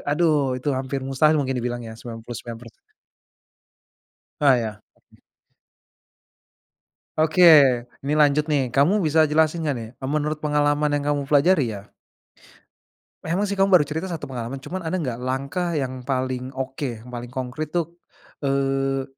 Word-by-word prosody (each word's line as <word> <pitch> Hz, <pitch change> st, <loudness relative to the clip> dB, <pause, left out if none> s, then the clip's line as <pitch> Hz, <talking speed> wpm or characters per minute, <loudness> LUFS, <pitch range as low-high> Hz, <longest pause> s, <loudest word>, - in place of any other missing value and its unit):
aduh 160 Hz, +2 st, +3 dB, 0.2 s
itu 130 Hz, +3 st, -4 dB
hampir 135 Hz, +1 st, -3 dB
mustahil 150 Hz, +4 st, +3 dB
mungkin 135 Hz, -2 st, -1 dB
dibilang 120 Hz, 0 st, -3 dB
ya -, -, -8 dB
99%. 115 Hz, 0 st, -8 dB, 1.7 s
Oh 140 Hz, -3 st, +6 dB
ya, 110 Hz, -3 st, -4 dB
pasti. -, -, -29 dB, 2.0 s
Oke, 160 Hz, +3 st, +3 dB, 0.6 s
nih 150 Hz, -, +1 dB
lanjut 150 Hz, 0 st, +3 dB
nih 150 Hz, -3 st, +2 dB
kamu 175 Hz, +8 st, +3 dB
bisa 155 Hz, 0 st, +4 dB
jelasin 160 Hz, +1 st, +2 dB
nggak 145 Hz, -, 0 dB
nih, 115 Hz, -, -7 dB
e 130 Hz, -, -5 dB
menurut 150 Hz, +1 st, -1 dB
pengalaman 150 Hz, 0 st, +1 dB
yang 145 Hz, -, -2 dB
kamu 140 Hz, -1 st, -2 dB
pelajari 150 Hz, +3 st, +4 dB
ya. 100 Hz, +1 st, -12 dB, 1.3 s
Memang 180 Hz, +6 st, 0 dB
sih 200 Hz, -, -2 dB
kamu 195 Hz, 0 st, +2 dB
baru 180 Hz, -6 st, +6 dB
cerita 160 Hz, +6 st, -4 dB
1 165 Hz, -2 st, -5 dB
pengalaman, 125 Hz, 0 st, -5 dB
cuman 180 Hz, +8 st, -6 dB
ada 170 Hz, +3 st, -2 dB
enggak 125 Hz, -8 st, -4 dB
langkah 140 Hz, +7 st, -2 dB
yang 130 Hz, -2 st, -3 dB
paling 130 Hz, 0 st, -2 dB
oke, 130 Hz, -3 st, -4 dB
yang 125 Hz, -, -11 dB
paling 120 Hz, 0 st, -6 dB
konkrit 130 Hz, +4 st, -5 dB
tuh, 170 Hz, 0 st, -2 dB, 0.5 s
eee 135 Hz, -1 st, 0 dB
140 Hz, 145 wpm, -23 LUFS, 130-155 Hz, 2.0 s, Oh